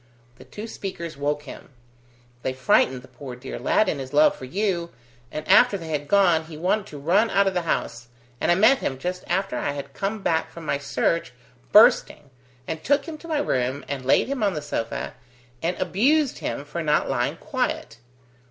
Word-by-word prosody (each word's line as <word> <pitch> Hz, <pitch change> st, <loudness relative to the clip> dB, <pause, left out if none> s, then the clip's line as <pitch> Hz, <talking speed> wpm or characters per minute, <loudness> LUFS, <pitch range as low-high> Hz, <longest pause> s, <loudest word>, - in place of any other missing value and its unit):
The -, -, -14 dB
two 210 Hz, -, -8 dB
speakers 175 Hz, -7 st, -6 dB
woke 145 Hz, +1 st, -2 dB
him; 140 Hz, -, -11 dB, 0.7 s
they 130 Hz, -, -2 dB
frightened 130 Hz, 0 st, +2 dB
the -, -, -14 dB
poor 125 Hz, 0 st, -9 dB
dear 125 Hz, +2 st, -7 dB
lad 215 Hz, -, +2 dB
in 150 Hz, -, -1 dB
his 130 Hz, +1 st, -7 dB
love 150 Hz, +1 st, +5 dB
for 130 Hz, -, -9 dB
you, 180 Hz, +2 st, -1 dB, 0.4 s
and 155 Hz, 0 st, -6 dB
after 205 Hz, +2 st, +6 dB
they 165 Hz, -3 st, -8 dB
had 145 Hz, -2 st, -2 dB
gone, 175 Hz, -4 st, +4 dB
he 155 Hz, -1 st, -10 dB
wanted 195 Hz, +5 st, 0 dB
to 150 Hz, -, -9 dB
run 185 Hz, +10 st, +2 dB
out 200 Hz, -1 st, +3 dB
of 195 Hz, -, +1 dB
the 180 Hz, -, 0 dB
house, 115 Hz, 0 st, -2 dB, 0.3 s
and -, -, +2 dB
I -, -, +5 dB
met 220 Hz, +8 st, +5 dB
him 130 Hz, -, -2 dB
just 180 Hz, +6 st, -4 dB
after 190 Hz, +3 st, -1 dB
I 145 Hz, -, -1 dB
had 140 Hz, -1 st, -7 dB
come 200 Hz, +4 st, -3 dB
back 160 Hz, -1 st, +1 dB
from 170 Hz, -1 st, -10 dB
my 140 Hz, -1 st, 0 dB
search, 165 Hz, +3 st, -1 dB, 0.4 s
bursting, 145 Hz, -2 st, +5 dB, 0.4 s
and 160 Hz, -1 st, -4 dB
took 285 Hz, +1 st, +2 dB
him 315 Hz, -2 st, -7 dB
to 335 Hz, -, -11 dB
my 315 Hz, -2 st, 0 dB
room, 130 Hz, -, -1 dB
and 140 Hz, -2 st, -4 dB
laid 130 Hz, -, +3 dB
him 275 Hz, -2 st, -3 dB
on 200 Hz, -4 st, +1 dB
the 150 Hz, -, -3 dB
sofa, 115 Hz, -6 st, -3 dB, 0.5 s
and 175 Hz, +2 st, -1 dB
abused 255 Hz, -, +2 dB
him 140 Hz, -, -4 dB
for 150 Hz, +4 st, -5 dB
not 150 Hz, -2 st, +2 dB
lying -, -, -1 dB
quiet. 115 Hz, -, -3 dB
165 Hz, 200 wpm, -24 LUFS, 140-200 Hz, 0.7 s, after